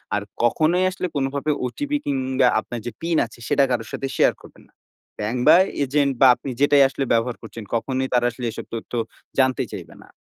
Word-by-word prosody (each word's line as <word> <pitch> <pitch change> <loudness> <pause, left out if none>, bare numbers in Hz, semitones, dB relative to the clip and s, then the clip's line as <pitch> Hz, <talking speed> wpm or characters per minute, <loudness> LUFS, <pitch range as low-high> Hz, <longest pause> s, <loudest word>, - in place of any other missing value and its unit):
আর 105 - 0 0.2
কখনোই 165 +9 +2
আসলে 185 - -3
কোনভাবে 140 +2 -1
OTP 285 - -5
কিংবা 130 -2 +1
আপনার 120 - -6
যে 120 - -3
পিন 165 0 0
আছে 115 +1 -15
সেটা 140 -1 +3
কারো 120 -2 -1
সাথে 135 - -3
শেয়ার - - +4
করবেন - - -16
না। - - -34 0.5
ব্যাংক, 110 +4 -2
বা - - +9 0.3
এজেন্ট, 140 +1 +1
বা 135 - +9
আপনি 135 - -8
যেটাই 145 -1 +6
আসলে 135 - -3
ব্যবহার 115 +1 +1
করছেন, 115 0 -9
কখনোই 130 +3 -1
তারা 120 -1 +3
আসলে 125 +1 -6
এসব - - -8
তথ্য 115 +1 -7 0.5
জানতে 130 -2 +2
চাইবে - - -8
না। - - -20
130 Hz, 195 wpm, -22 LUFS, 120-140 Hz, 0.5 s, বা